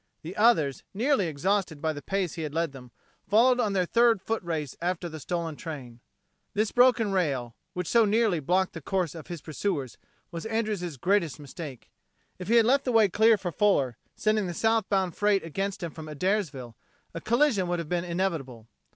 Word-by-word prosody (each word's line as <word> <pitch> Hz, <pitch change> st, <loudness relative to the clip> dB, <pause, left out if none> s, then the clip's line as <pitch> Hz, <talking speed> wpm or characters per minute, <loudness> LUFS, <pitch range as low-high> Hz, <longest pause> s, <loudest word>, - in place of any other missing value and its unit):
The 170 Hz, +4 st, -7 dB
others, 165 Hz, -, +3 dB
nearly 235 Hz, -3 st, +2 dB
exhausted 175 Hz, +1 st, -1 dB
by 155 Hz, +2 st, -1 dB
the 145 Hz, -, -7 dB
pace 190 Hz, 0 st, -2 dB
he 165 Hz, -, -5 dB
had 155 Hz, -1 st, -5 dB
led 165 Hz, -2 st, 0 dB
them, 130 Hz, -2 st, -12 dB, 0.4 s
followed 245 Hz, +4 st, +5 dB
on 215 Hz, -5 st, +1 dB
their 185 Hz, -2 st, +2 dB
third 230 Hz, +2 st, +4 dB
foot 225 Hz, +4 st, -2 dB
race 160 Hz, -5 st, -4 dB
after 175 Hz, 0 st, -1 dB
the 160 Hz, -1 st, -8 dB
stolen 170 Hz, 0 st, -3 dB
train. 135 Hz, -8 st, -8 dB, 0.6 s
This 215 Hz, +1 st, +1 dB
broken 245 Hz, -4 st, +4 dB
rail, 135 Hz, -11 st, -1 dB, 0.2 s
which 180 Hz, 0 st, -3 dB
so 230 Hz, +7 st, +4 dB
nearly 215 Hz, -4 st, +2 dB
blocked 180 Hz, +6 st, +1 dB
the 165 Hz, -, -7 dB
course 180 Hz, -1 st, -1 dB
of 160 Hz, -3 st, -10 dB
his 170 Hz, -4 st, -6 dB
pursuers, 150 Hz, -, -3 dB, 0.3 s
was 170 Hz, +5 st, -5 dB
Andrews' 210 Hz, -8 st, -2 dB
greatest 175 Hz, 0 st, +1 dB
mistake. 145 Hz, -2 st, -9 dB, 0.5 s
If 180 Hz, -, -7 dB
he 230 Hz, -, +3 dB
had 230 Hz, -1 st, +6 dB
left 270 Hz, +4 st, +3 dB
the 255 Hz, -, +1 dB
way 220 Hz, -3 st, +5 dB
clear 220 Hz, +4 st, +4 dB
for 185 Hz, -3 st, -4 dB
Fuller, 145 Hz, -, +2 dB, 0.2 s
sending 215 Hz, -2 st, +1 dB
the 175 Hz, -, -5 dB
southbound 200 Hz, -5 st, +1 dB
freight 205 Hz, -2 st, +2 dB
against 195 Hz, +4 st, -3 dB
him 170 Hz, -, -3 dB
from 155 Hz, 0 st, -9 dB
Adairsville, 150 Hz, -, -2 dB, 0.4 s
a 165 Hz, -, -6 dB
collision 235 Hz, -5 st, +2 dB
would 175 Hz, 0 st, 0 dB
have 170 Hz, -2 st, -4 dB
been 175 Hz, +1 st, -1 dB
inevitable. 165 Hz, -, -3 dB
180 Hz, 190 wpm, -27 LUFS, 155-210 Hz, 0.6 s, had